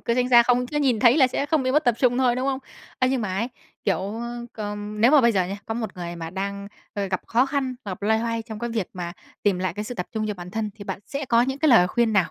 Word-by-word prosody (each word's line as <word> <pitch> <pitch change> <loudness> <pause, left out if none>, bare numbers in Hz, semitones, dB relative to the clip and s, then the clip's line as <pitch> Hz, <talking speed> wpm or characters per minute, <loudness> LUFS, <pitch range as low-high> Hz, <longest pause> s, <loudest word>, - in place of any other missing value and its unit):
cứ 235 - 0
tránh 250 0 +1
xa, 240 -2 +8
không 245 +1 +2
cứ 295 - -5
nhìn 260 -7 +2
thấy 245 +1 +6
là 270 -4 +6
sẽ 270 +2 -2
không 300 -1 +1
bị 255 - 0
mất 300 +3 +3
tập 245 -3 +3
trung 250 -1 +3
thôi, 250 -2 +3
đúng 255 +1 -1
không? 270 -1 0 0.4
Ơ, 255 - +3
nhưng 265 -2 0
mà 200 -4 -2
ấy, 230 +5 -1 0.4
kiểu, 195 - +2
ơ, 235 +4 -5
c - - -27 0.4
nếu 230 +4 +5
mà 300 -1 +7
bây 235 -2 +4
giờ 190 -3 +2
nhá, 195 +3 -4
có 225 - -3
một 225 -4 -4
người 175 -1 -5
mà 165 -1 -6
đang, 200 +2 -4 0.3
ơ, 200 -2 -1
gặp 185 -1 -2
khó 245 +3 +3
khăn, 270 -2 -1
gặp 195 -2 -6
loay 220 +2 +3
hoay 230 0 -2
trong 220 -1 -8
cái 235 +1 -3
việc 220 -5 -1
mà 175 -2 -5 0.3
tìm 200 -3 +2
lại 185 -2 -1
cái 210 - -4
sự 245 - -6
tập 180 - -4
trung 220 -1 -2
cho 210 - -2
bản 180 -1 -9
thân, 215 +1 -2
thì 205 - -10
bạn - - -4
sẽ 280 +1 -4
có 235 -1 +4
những 265 +2 -2
cái 310 +1 +3
lời 225 -9 +7
khuyên 230 +3 +1
nào 190 -5 +2
230 Hz, 305 wpm, -24 LUFS, 200-250 Hz, 0.4 s, xa